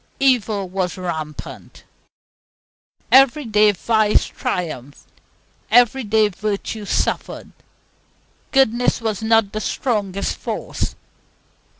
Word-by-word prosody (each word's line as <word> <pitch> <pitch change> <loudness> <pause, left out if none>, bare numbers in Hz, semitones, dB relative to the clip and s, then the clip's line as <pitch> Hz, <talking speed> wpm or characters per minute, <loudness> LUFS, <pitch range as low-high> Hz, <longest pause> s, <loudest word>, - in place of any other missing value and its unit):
Evil 220 -7 +1
was 185 0 -3
rampant. 160 -4 -7 1.3
Every 270 +2 +5
day 210 -1 +4
vice 215 +2 +2
triumphed, 145 -6 -5 0.6
every 245 +2 +4
day 215 0 +2
virtue 210 +2 -4
suffered. - - -2 1.0
Goodness 245 -3 +2
was 220 -2 -3
not 225 -2 +2
the 215 - -4
strongest 200 -4 -2
force. - - -4
215 Hz, 85 wpm, -20 LUFS, 195-230 Hz, 1.3 s, Every